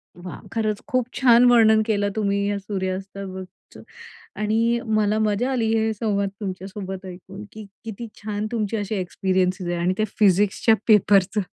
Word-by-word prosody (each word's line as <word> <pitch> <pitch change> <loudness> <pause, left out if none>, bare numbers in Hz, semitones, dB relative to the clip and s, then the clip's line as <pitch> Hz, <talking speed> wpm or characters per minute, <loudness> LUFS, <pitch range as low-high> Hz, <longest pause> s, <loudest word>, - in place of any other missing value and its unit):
वाह! 175 +1 -9
खरंच 215 -2 -1
खूप 255 -4 0
छान 245 -2 +5
वर्णन 220 -2 +5
केलं 205 -2 0
तुम्ही 200 -2 0
या 205 - -1
सुर्यास्ताबाबतच 190 -1 -6 0.6
आणि 225 +3 +1 0.2
मला 210 +1 +1
मजा 215 +4 0
आली 235 -4 0
हे 220 0 +1
संवाद 200 -2 -1
तुमच्यासोबत 190 -1 -6
ऐकून, 190 +3 -10
की 215 0 -9 0.2
किती 225 +1 -7 0.2
छान 210 0 -3
तुमची 225 -1 -1
अशी 205 0 -3
एक्सपिरियन्सेस 185 -1 -1
आहे. 175 - -2
आणि 175 +2 0
ते 215 - +2
फिजिक्सच्या 205 +3 +3
पेपरचं. 205 -1 +4
205 Hz, 145 wpm, -23 LUFS, 190-220 Hz, 0.6 s, छान